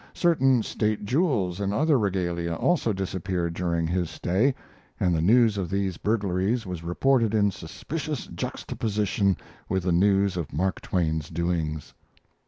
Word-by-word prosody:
Certain 135 -8 +3
state 105 -1 -1
jewels 115 - +1
and 100 -1 -1
other 145 +5 +3
regalia 85 -4 -1
also 150 - +1
disappeared 95 -3 -2
during 85 -1 -1
his 85 0 -1
stay, 95 - +1 0.4
and 90 - +2
the 80 - +1
news 110 +2 +4
of 90 -3 -2
these 95 -2 -1
burglaries 105 +2 0
was 90 -3 -5
reported 115 +5 +2
in 100 -2 +3
suspicious 145 - -5
juxtaposition 100 -3 -1 0.3
with 95 -1 0
the 90 - +1
news 95 +1 +3
of 85 -4 -4
Mark 90 +6 -1
Twain's 80 -4 -1
doings. 80 -3 -2
95 Hz, 140 wpm, -26 LUFS, 85-110 Hz, 0.4 s, news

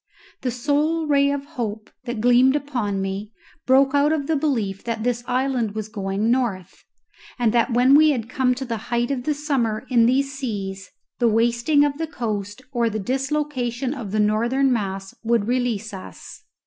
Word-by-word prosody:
The 255 - -1
sole 295 +6 0
ray 280 -1 +3
of 280 0 -2
hope 220 -7 -5
that 240 -3 -4
gleamed 245 +3 +5
upon 245 -9 -2
me 195 +2 -4 0.4
broke 270 +1 +4
out 285 +1 +3
of 305 -3 0
the 320 - 0
belief 230 -10 -1
that 230 -2 -3
this 240 0 -1
island 250 -4 0
was 215 -1 -4
going 200 +1 -1
north, 205 -8 -2 0.5
and 235 -3 +1
that 235 +1 +2
when 250 +3 +5
we 310 +2 +7
had 240 -6 -1
come 255 0 +1
to 265 +1 -5
the 230 -2 -3
height 240 +2 0
of 255 -2 -3
the 300 - +1
summer 265 -8 -1
in 230 -2 +5
these 275 +3 +1
seas, 195 -8 -5 0.3
the 240 - +3
wasting 235 +6 +3
of 285 +1 -2
the 325 - -2
coast 215 -4 -4
or 235 -3 +1
the 215 - -3
dislocation 265 +1 -2
of 240 -8 -6
the 215 - 0
northern 235 +6 +2
mass 195 -3 -3
would 230 -2 +1
release 235 -4 -1
us. 190 - -10
245 Hz, 180 wpm, -22 LUFS, 215-275 Hz, 0.5 s, we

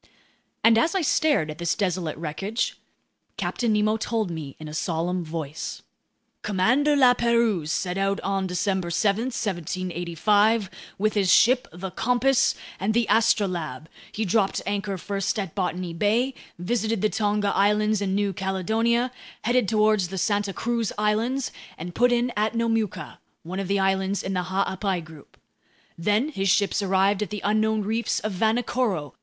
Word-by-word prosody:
And 225 0 +6
as 325 +9 +1
I 380 - +2
stared 290 - +2
at 150 - -10
this 170 -1 0
desolate 180 -6 -2
wreckage, 170 +8 -3 0.6
Captain 235 -2 -1
Nemo 215 +1 +2
told 220 -4 -1
me 155 -4 -6
in 155 - -9
a 150 - -8
solemn 170 +2 -1
voice: 155 -2 -5 0.6
"Commander 250 +10 +2
La 255 -3 +6
Pérouse 235 -9 +1
set 180 +3 -1
out 195 0 0
on 195 0 -1
December 185 0 -1
7, 200 +6 +1
1785, 190 - 0 0.3
with 215 +2 +1
his 195 -3 +2
ships, 250 +2 +4
the 180 +3 -6
Compass 250 +6 +2 0.2
and 210 +4 0
the 235 0 +3
Astrolabe. 175 - +1 0.2
He 220 - -2
dropped 195 +1 +1
anchor 200 -1 -2
first 195 +3 -2
at 195 -6 -3
Botany 180 -2 -2
Bay, 220 +9 +1 0.2
visited 220 +3 -1
the - - +5
Tonga 205 -1 0
Islands 210 +1 +2
and 195 -1 0
New 200 -1 0
Caledonia, 220 +7 0 0.3
headed 240 -1 +2
toward 215 -1 +3
the 190 +1 -2
Santa 205 +1 0
Cruz 230 +1 -1
Islands, 225 +5 0 0.3
and 175 +2 -7
put 245 +5 +3
in 240 0 +1
at 215 +2 0
Nomuka, 225 -3 -1 0.2
one 180 +3 -5
of 195 - -3
the 200 +1 +1
islands 190 0 0
in 190 - -3
the 180 -1 -1
Ha'apai 190 0 -1
group. 155 -3 -15 0.6
Then 210 - +1
his 195 -10 -1
ships 200 +2 +2
arrived 195 +1 +2
at 210 - -2
the 210 -2 -5
unknown 215 +1 +2
reefs 225 +3 -1
of 215 - -2
Vanikoro. 220 - 0
205 Hz, 155 wpm, -25 LUFS, 185-225 Hz, 0.6 s, And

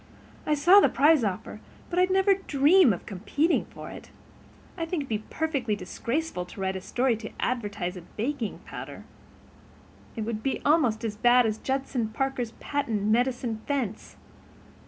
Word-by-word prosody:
I 300 - +3
saw 350 +7 +7
the - - +5
prize 290 +1 +4
offer, 210 +1 -4 0.3
but 355 - +1
I'd 365 +1 +4
never 385 +1 +4
dream 310 - +4
of 180 - -4
competing 275 - 0
for - - -10
it. - - -11 0.7
I 335 - -3
think 330 -1 -2
it - - -3
would 275 - -13
be 215 -1 -2
perfectly 285 -9 -1
disgraceful 230 - -3
to 180 - -12
write 190 0 -1
a 190 - -4
story 245 +5 +1
to 220 0 -7
advertise 205 -7 -2
a 180 - -8
baking 230 - -4
powder. - - -8 1.1
It 225 - -4
would 220 0 -3
be 270 - -1
almost 250 -8 +3
as 215 -2 -3
bad 245 +2 +5
as 220 0 -1
Judson 265 -3 -1
Parker's 245 0 -2
patent 230 -8 -2
medicine 235 +1 0
fence." 255 -8 -3
245 Hz, 165 wpm, -27 LUFS, 215-290 Hz, 1.1 s, saw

